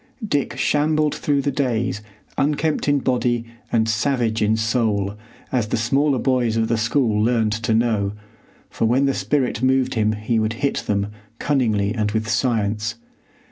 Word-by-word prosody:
Dick 145 -7 -1
shambled 150 0 +1
through 140 -2 0
the 140 - 0
days 120 -6 -1 0.3
unkempt 150 +2 0
in 145 -1 +2
body 120 -2 0 0.3
and 110 -1 +2
savage 115 0 0
in 110 +1 +2
soul, 110 -3 0 0.4
as 120 -4 0
the - - -1
smaller 135 +5 +2
boys 125 -3 +1
of 110 0 +1
the 115 - +2
school 115 -2 +1
learned 115 -2 +2
to 110 0 0
know, 110 -4 +1 0.5
for - - -2
when 125 +5 +3
the 135 - +2
spirit 130 -6 -1
moved 130 0 +2
him 110 -2 +1
he 110 +2 -1
would 110 0 0
hit 140 +4 -1
them, 100 0 0 0.3
cunningly 110 -9 +1
and 105 -3 -1
with 110 -1 -1
science. 110 -2 0
115 Hz, 160 wpm, -21 LUFS, 110-135 Hz, 0.5 s, when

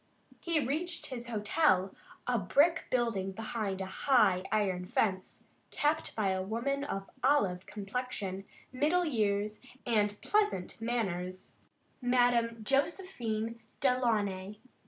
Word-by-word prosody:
He 335 -2 +2
reached 315 +6 -2
his 240 -2 -5
hotel, 210 - +2 0.3
a 245 -2 +1
brick 290 - +3
building 225 -6 0
behind 215 -2 -3
a - - -2
high 195 -2 +3
iron 190 -4 0
fence, 190 -2 -1 0.3
kept 305 +2 0
by 210 -3 +1
a 190 0 0
woman 235 +8 -1
of 195 -9 -4 0.2
olive 200 -10 +2
complexion, 200 -2 -4 0.3
middle 310 +7 +2
years, 210 -6 0 0.2
and 210 -4 +2
pleasant 415 - 0
manners, 185 -6 -2 0.5
Madame 245 -2 +2
Josephine 240 - -1 0.2
Delaunay. 210 -7 +1
225 Hz, 110 wpm, -32 LUFS, 195-260 Hz, 0.5 s, brick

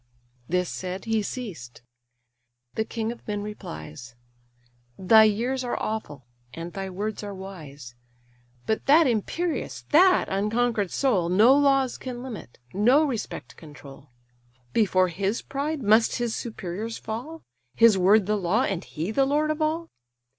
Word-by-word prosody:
This 180 +1 +1
said, 185 +3 -5
he 225 -1 +1
ceased. 180 - -7 0.9
The 220 - 0
king 225 0 -3
of 240 - -12
men 205 -1 -3
replies: 115 - -9 0.8
"Thy 220 +4 +6
years 240 +5 0
are 245 - -2
awful, 150 - -4 0.3
and 165 +1 -7
thy 195 -1 -5
words 205 +4 -4
are 205 -1 -6
wise. 150 -10 -10 0.7
But 220 - -2
that 310 +4 +6
imperious, 295 - -2
that 365 +4 +5
unconquer'd 210 +1 0
soul, 195 -11 +1
No 215 +9 +6
laws 275 -3 +2
can 250 -1 -6
limit, 225 - -9 0.2
no 245 +10 +4
respect 250 -7 -5
control. 145 -2 -13 0.6
Before 185 -4 +3
his 195 +6 -2
pride 280 +1 -3
must 220 +2 +4
his 240 -2 -2
superiors 220 0 -5
fall; 260 +10 -7 0.3
His 230 -2 +6
word 195 +2 +4
the 210 +2 0
law, 200 +6 +1
and 195 -7 -2
he 165 +6 -4
the 270 +4 +2
lord 300 +3 +1
of 310 +1 -4
all? 320 +2 0
215 Hz, 140 wpm, -25 LUFS, 185-255 Hz, 0.9 s, Thy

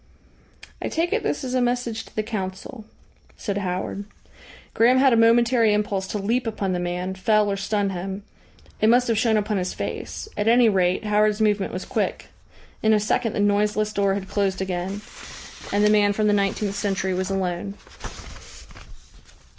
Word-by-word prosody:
"I - - -2
take 335 +2 -1
it - - +1
this 290 - -2
is 255 -1 -4
a 255 - +2
message 245 -2 -1
to - - -19
the 215 - 0
Council," 210 +2 -6 0.5
said 200 -2 -3
Howard. 185 +1 -3 0.7
Graham 240 +3 +4
had 265 -1 +5
a - - +5
momentary 230 -1 +4
impulse 200 -2 -1
to 210 - -3
leap 230 +5 -1
upon 200 -4 -2
the 180 - -1
man, 180 +1 -3
fell 210 +2 +2
or - - 0
stun 200 0 -1
him. 190 +2 -5 0.6
It 215 - +4
must 245 +2 +4
have 225 - +2
shown 220 -1 +2
upon 210 0 -1
his 185 -1 -3
face; - - -5
at 205 - -1
any 235 0 +5
rate 185 -2 +1
Howard's 210 0 +2
movement 210 -2 +1
was 185 - -5
quick. - - -2 0.5
In 220 0 +3
a 210 - +4
second 220 +2 0
the - - -3
noiseless 210 +1 +1
door 200 -1 +1
had 195 -1 -5
closed 195 -2 -1
again, 190 +1 -3 0.7
and 205 +1 +2
the 210 - +5
man 205 -1 +4
from 215 +1 0
the 210 - +3
nineteenth 200 0 0
century 195 -2 -1
was 185 +1 -2
alone. 190 0 -2
205 Hz, 180 wpm, -23 LUFS, 195-220 Hz, 0.7 s, had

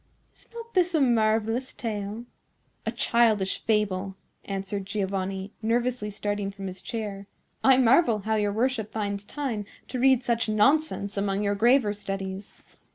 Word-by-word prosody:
Is - - -11
not 465 0 -9
this 360 -2 +3
a - - +4
marvellous 225 0 +2
tale?" 215 0 -4 0.6
"A - - +1
childish 220 -5 +2
fable," 200 -3 0 0.3
answered 195 0 -4
Giovanni, 195 -1 -2
nervously 235 0 0
starting 205 -1 -2
from 195 0 -8
his 185 -1 -6
chair. 205 -3 -5 0.4
"I 265 -1 +6
marvel 250 -1 +5
how 220 +2 -1
your 210 -1 +1
worship 225 -1 -1
finds 200 -2 -3
time 255 -7 -3 0.3
to 255 - -3
read 260 0 +4
such 235 -2 0
nonsense 215 -2 +2
among 200 0 0
your 200 0 +1
graver 230 +1 +4
studies." 195 -1 -5
215 Hz, 145 wpm, -26 LUFS, 200-240 Hz, 0.6 s, I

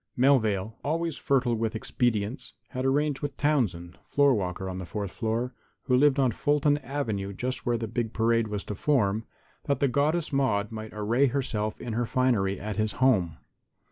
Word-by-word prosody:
Melvale, 110 -6 +3
always 165 +1 -1
fertile 135 -3 +1
with 115 -1 -1
expedients, 120 +1 -1 0.2
had 130 +1 -3
arranged 145 +1 +1
with 145 -2 -4
Townsend, 105 - 0
floor 140 -1 +3
walker 95 -3 -2
on 95 0 -4
the 95 - -5
fourth 100 -1 -4
floor, 115 +3 -2 0.3
who 125 - +2
lived 140 +1 +4
on 130 -3 +3
Fulton 145 +4 +2
avenue 115 -8 -3
just 125 +5 -4
where 120 -1 +2
the 115 0 -3
big 115 0 -2
parade 115 0 +2
was 105 -2 -3
to - - -5
form, 110 -3 +1 0.4
that 140 - 0
the 140 - +3
Goddess 150 +5 0
Maude 115 -7 +1
might 110 0 -6
array 115 +6 +2
herself 115 -5 -2
in 120 - -5
her 120 +1 0
finery 110 -8 +1
at 105 +1 -5
his 110 -1 0
home. 100 -12 +2
120 Hz, 175 wpm, -27 LUFS, 105-135 Hz, 0.4 s, lived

